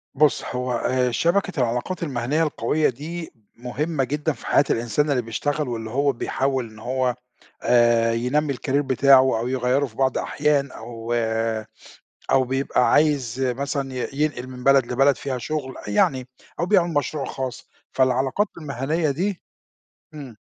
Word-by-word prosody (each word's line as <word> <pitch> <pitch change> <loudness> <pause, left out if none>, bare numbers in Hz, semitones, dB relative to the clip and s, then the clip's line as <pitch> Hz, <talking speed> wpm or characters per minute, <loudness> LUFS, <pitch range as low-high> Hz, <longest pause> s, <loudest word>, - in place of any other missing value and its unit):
بُص 150 0 +3
هو 125 0 -3
آآ 125 +1 +1
شبكة 175 +5 +1
العلاقات 125 +9 -1
المهنيّة 140 +2 0
القوية 150 0 +1
دي 160 +6 -6 0.2
مهمة 135 +5 -2
جدًا 150 +4 -1
في 120 - -14
حياة - - +4
الإنسان 120 +6 0
اللي 130 -3 +2
بيشتغل، 145 +6 -2
واللي 115 -2 -4
هو 140 +4 +2
بيحاول 130 -1 -2
إن 110 - -15
هو 125 +1 -1 0.5
آآ 120 -1 +4
ينمّي 140 +5 0
الcareer 130 - -7
بتاعه 130 -2 +4
أو 120 - -2
يغيّره 130 +2 +1
في 115 -5 -12
بعض 130 0 +1
أحيان 145 -2 0
أو 115 0 -6 1.2
أو 130 - +5
بيبقى 130 0 +1
عايز 145 -6 +2
مثلًا 135 +1 -2
ي 125 - -3
ينقل 145 -3 -1
من 125 -1 -9
بلد 135 -1 +5
لبلد 135 +2 +4
فيها 135 -2 -4
شُغل، 130 0 -4
أ - - -8
يعني 130 +5 +2 0.3
أو - - +1
بيعمل 180 -3 +3
مشروع 145 0 -1
خاص، 130 -2 -6 0.2
فالعلاقات 130 - +2
المهنيّة 150 +1 -1
دي 185 +7 -2 0.7
إمم. 140 -6 -9
135 Hz, 150 wpm, -23 LUFS, 125-150 Hz, 1.2 s, أو